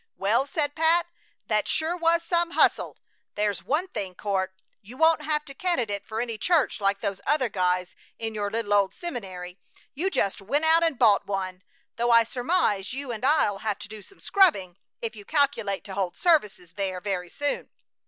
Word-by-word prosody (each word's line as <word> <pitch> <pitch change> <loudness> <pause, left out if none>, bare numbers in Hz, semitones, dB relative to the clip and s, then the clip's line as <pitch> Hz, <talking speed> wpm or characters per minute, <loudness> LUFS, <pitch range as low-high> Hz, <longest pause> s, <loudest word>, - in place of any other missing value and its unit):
"Well," 230 +8 +1
said 290 -1 -1
Pat, 325 +2 +3 0.4
"that 215 -2 0
sure 320 +2 0
was 335 -1 +2
some 340 0 0
hustle! - - +3 0.4
There's 205 -1 -1
one 315 +7 0
thing, 195 - -5
Court. 190 -2 -1 0.3
You 230 +6 -13
won't 320 0 +4
have 300 0 -1
to 275 - -9
candidate 245 - -1
for 220 0 -4
any 230 -2 -3
church 325 -10 +1
like 195 0 +1
those 195 -2 -3
other 275 -5 +2
guys 180 -2 0 0.2
in 225 -1 -4
your 205 -1 -2
little 220 -1 -2
old 200 -2 +2
seminary. 190 - -6 0.3
You 335 +8 -1
just 200 - -1
went 285 +11 0
out 325 +1 +5
and 325 -5 +1
bought 215 -5 +4
one; 185 -2 -3 0.4
though 240 +1 +1
I 230 -1 +7
surmise 245 - 0
you 270 -1 -5
and 225 0 -6
I'll 260 -8 +3
have 210 -1 -2
to 205 - -8
do 215 0 -10
some 395 - -17
scrubbing 245 - +3 0.3
if 230 0 -3
you 205 - -10
calculate 235 -8 0
to 195 - -8
hold 190 -2 -2
services 210 - +1
there 190 -2 -3
very 180 -2 -3
soon." 290 +8 -2
225 Hz, 185 wpm, -26 LUFS, 200-305 Hz, 0.4 s, I